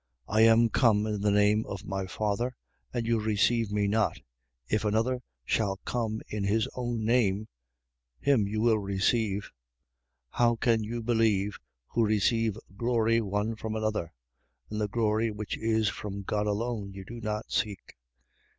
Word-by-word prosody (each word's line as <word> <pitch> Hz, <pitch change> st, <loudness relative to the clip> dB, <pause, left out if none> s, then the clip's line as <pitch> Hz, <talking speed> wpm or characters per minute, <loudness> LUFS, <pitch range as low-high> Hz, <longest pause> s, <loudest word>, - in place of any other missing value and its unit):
5:43. -, -, -4 dB
I 110 Hz, -, +5 dB
am 115 Hz, +1 st, +6 dB
come 105 Hz, -2 st, +3 dB
in 105 Hz, -2 st, -2 dB
the 105 Hz, -, +2 dB
name 105 Hz, +1 st, +4 dB
of 100 Hz, +1 st, -6 dB
my 95 Hz, -1 st, -3 dB
Father, 110 Hz, +6 st, -1 dB, 0.4 s
and 120 Hz, -2 st, -2 dB
you 115 Hz, 0 st, +2 dB
receive 110 Hz, +1 st, +1 dB
me 105 Hz, -1 st, +1 dB
not: 110 Hz, +2 st, +1 dB, 0.5 s
if 110 Hz, 0 st, 0 dB
another 115 Hz, +4 st, +1 dB, 0.2 s
shall 100 Hz, -, 0 dB
come 110 Hz, -2 st, -2 dB
in 105 Hz, -1 st, -3 dB
his 105 Hz, +3 st, +1 dB
own 120 Hz, -3 st, -2 dB
name, 110 Hz, -3 st, +2 dB, 0.7 s
him 130 Hz, -8 st, +3 dB
you 110 Hz, +1 st, -2 dB
will 115 Hz, -2 st, +4 dB
receive. 100 Hz, +1 st, 0 dB, 0.8 s
5:44. -, -, -14 dB
How 120 Hz, -1 st, +4 dB
can 115 Hz, -1 st, +2 dB
you 115 Hz, +2 st, -4 dB
believe, 110 Hz, -4 st, +1 dB, 0.3 s
who 115 Hz, -, +1 dB
receive 110 Hz, 0 st, +2 dB, 0.2 s
glory 115 Hz, 0 st, +2 dB
one 105 Hz, +2 st, -1 dB
from 110 Hz, 0 st, -4 dB
another: 110 Hz, -6 st, -1 dB, 0.6 s
and 105 Hz, 0 st, -2 dB
the 105 Hz, -, +1 dB
glory 110 Hz, +1 st, +1 dB
which 105 Hz, 0 st, -4 dB
is 110 Hz, -1 st, +1 dB
from 100 Hz, -1 st, -6 dB
God 105 Hz, +2 st, -1 dB
alone, 105 Hz, -1 st, -2 dB
you 95 Hz, -1 st, -9 dB
do 120 Hz, +2 st, -8 dB
not 105 Hz, 0 st, -3 dB
seek? 105 Hz, -3 st, -2 dB
110 Hz, 160 wpm, -29 LUFS, 105-115 Hz, 0.8 s, am